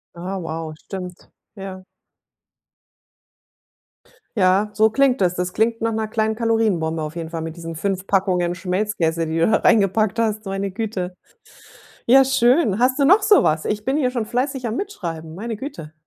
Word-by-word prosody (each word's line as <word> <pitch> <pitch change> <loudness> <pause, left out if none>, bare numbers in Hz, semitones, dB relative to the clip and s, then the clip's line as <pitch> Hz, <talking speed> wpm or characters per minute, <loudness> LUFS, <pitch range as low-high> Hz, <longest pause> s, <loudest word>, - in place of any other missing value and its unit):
Ah, 185 +3 -5
wow, 160 -1 -5
stimmt. 180 +1 -9 0.3
Ja. 190 -2 -8 2.5
Ja, 195 +2 +3
so 220 0 +4
klingt 270 0 +2
es. 180 -1 +3
Das 180 0 -3
klingt 230 +1 0
nach 230 - 0
'ner 220 -1 -2
kleinen 220 0 0
Kalorienbombe 215 -9 0
auf 155 +2 -5
jeden 165 -1 -5
Fall 165 - -4
mit 160 0 -6
diesen 165 -1 -7
5 190 +3 -2
Packungen 185 -3 +1
Schmelzkäse, 180 -2 -1
die 160 +1 -2
du 165 - +3
da - - +4
reingepackt 215 +1 +2
hast, 215 -2 -1
meine 195 +1 -2
Güte. 195 -4 -4 0.9
Ja 265 +3 +7
schön. 255 - +3
Hast 255 +3 +2
du 280 - +4
noch 390 +8 +6
so 420 -2 +5
was? 155 0 +1
Ich 210 0 -2
bin 265 +2 +1
hier 255 -4 +1
schon 240 -3 -2
fleißig 250 +2 -2
am 220 - -3
Mitschreiben, 165 - -5
meine 225 +4 -4
Güte. 165 - -8
200 Hz, 170 wpm, -21 LUFS, 175-230 Hz, 2.5 s, Ja